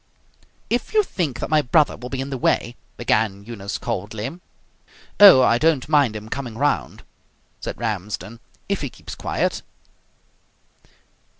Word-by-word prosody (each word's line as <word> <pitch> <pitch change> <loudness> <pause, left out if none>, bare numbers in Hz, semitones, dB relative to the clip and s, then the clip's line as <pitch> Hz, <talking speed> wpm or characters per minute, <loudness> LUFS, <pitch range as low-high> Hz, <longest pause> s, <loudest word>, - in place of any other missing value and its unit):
"If 245 - -2
you 425 - +5
think 155 - -3
that - - -3
my 155 -1 +5
brother 150 +2 +3
will 125 - -8
be 135 0 -3
in 135 +1 -5
the 135 - -2
way 120 0 +1
" - - -39
began 105 -4 0
Eunice 100 -4 -5
coldly. 110 - -4 0.8
"Oh, 195 -11 +10
I 120 -1 +3
don't 155 -4 +2
mind 145 -7 +3
him 105 0 -7
coming 120 -2 -5
round," 145 +2 -1 0.6
said - - -6
Ramsden, 105 0 -4 0.3
"if - - -1
he - - -3
keeps - - -11
quiet." - - -2
125 Hz, 145 wpm, -22 LUFS, 110-145 Hz, 0.8 s, Oh